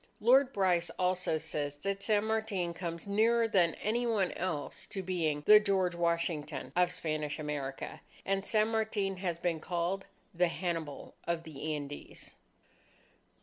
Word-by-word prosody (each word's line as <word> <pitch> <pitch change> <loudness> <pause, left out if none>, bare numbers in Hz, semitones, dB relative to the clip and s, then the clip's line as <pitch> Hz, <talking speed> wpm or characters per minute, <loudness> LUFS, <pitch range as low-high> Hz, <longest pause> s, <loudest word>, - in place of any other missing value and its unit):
Lord 260 +4 +5
Bryce 180 -5 +2
also 180 -3 +1
says 145 -2 -3
that 195 +6 -3
San 210 0 +2
Martin 220 -6 -1
comes 170 +1 -5
nearer 225 +3 +3
than 175 -6 +3
any 240 +3 0
one 205 -6 +2
else 165 -5 -3
to 195 - -5
being 160 -5 -1
"the 210 0 +9
George 190 -4 +1
Washington 170 -5 -1
of 180 0 +3
Spanish 155 -2 -2
America." 145 -3 -4 0.2
And 195 0 0
San 215 +1 +2
Martin 215 -3 0
has 180 -3 -2
been 170 -2 -1
called, 175 +4 -2 0.3
"the 180 0 +3
Hannibal 165 -4 -4
of 170 -1 0
the 155 0 -4
Andes." 145 0 -8
180 Hz, 145 wpm, -32 LUFS, 160-200 Hz, 0.3 s, the